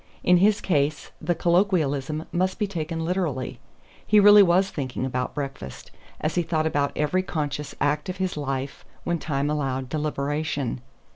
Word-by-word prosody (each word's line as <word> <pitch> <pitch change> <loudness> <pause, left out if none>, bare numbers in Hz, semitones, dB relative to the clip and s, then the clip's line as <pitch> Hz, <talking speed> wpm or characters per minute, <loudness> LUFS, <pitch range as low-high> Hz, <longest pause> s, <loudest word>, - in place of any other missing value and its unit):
In 180 0 +5
his 200 +3 +3
case 150 -4 0
the 175 +2 0
colloquialism 160 -5 +1
must 185 +2 0
be 210 - 0
taken 165 -4 -4
literally; 165 -8 -2 0.4
he 210 - +4
really 205 0 +9
was 190 +1 +3
thinking 130 -3 -3
about 125 -1 -3
breakfast, 135 - -6 0.3
as 155 - -1
he 175 - +2
thought 160 -2 -1
about 145 -3 +1
every 150 +5 +1
conscious 150 -5 -4
act 150 +5 0
of 185 - -4
his 185 -1 -2
life 135 -2 -4 0.2
when 170 -1 -1
time 140 -2 -1
allowed 135 -3 -2
deliberation. 145 -3 -2
155 Hz, 155 wpm, -25 LUFS, 140-180 Hz, 0.4 s, really